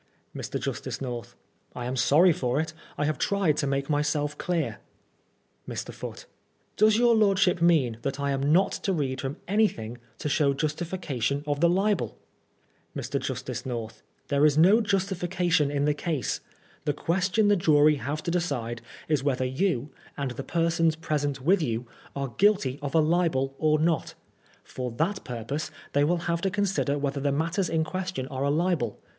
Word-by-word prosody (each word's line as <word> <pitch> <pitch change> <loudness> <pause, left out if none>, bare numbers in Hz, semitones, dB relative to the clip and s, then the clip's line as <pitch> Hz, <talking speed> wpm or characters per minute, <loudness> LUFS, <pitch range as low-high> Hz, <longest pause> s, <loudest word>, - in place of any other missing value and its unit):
Mr. - - -4
Justice - - -4
North: 120 -2 -5 0.4
I 120 - -4
am 125 +1 -2
sorry 160 +7 +5
for 125 -1 -1
it. 160 0 -2 0.2
I 150 - 0
have 155 +1 -1
tried 195 -7 +2
to 140 - 0
make 135 0 -1
myself 150 0 0
clear. 155 -10 -2 0.9
Mr. - - -5
Foote: - - -8 0.5
Does 215 +1 +5
your 240 0 +5
lordship 195 -5 +3
mean 145 -10 +3
that 140 +2 -3
I 140 0 0
am 140 +2 +1
not 185 +4 +4
to 195 - 0
read 135 -5 -1
from 135 +1 -4
anything 150 - 0 0.2
to - - -4
show 140 -1 +2
justification 150 -3 -2
of 145 -1 -1
the 170 +2 +4
libel? 190 - +1 0.8
Mr. - - -2
Justice - - -4
North: 115 -3 -5 0.3
There 140 0 +2
is 150 -1 +5
no 195 +8 +6
justification 185 -5 +1
in 145 0 0
the 150 - +3
case. 150 -3 -2 0.5
The 145 - +1
question 185 +7 +1
the 205 - +5
jury 150 -4 +4
have 145 +5 -4
to 170 - -2
decide 125 -10 -2 0.3
is 150 -4 +1
whether 130 -2 +1
you, 140 0 -1 0.3
and 140 -3 -2
the 125 +2 -6
persons 165 0 +1
present 145 -4 -2
with 180 +7 +3
you, 120 -4 -2 0.3
are 140 -1 -2
guilty 190 -10 +3
of 145 +1 -4
a - - +6
libel 155 -5 +1
or 155 -1 +3
not 160 -1 0 0.5
For 125 -1 -5
that 180 - -1
purpose 125 +5 -4 0.2
they 145 - +3
will 170 +3 +1
have 170 -1 0
to 195 - +1
consider 190 -7 0
whether 140 0 -2
the 140 0 +1
matters 165 +5 0
in 160 -1 +1
question 180 -4 -4
are 135 -1 -3
a 140 - +2
libel. 155 - 0
150 Hz, 175 wpm, -27 LUFS, 135-175 Hz, 0.9 s, no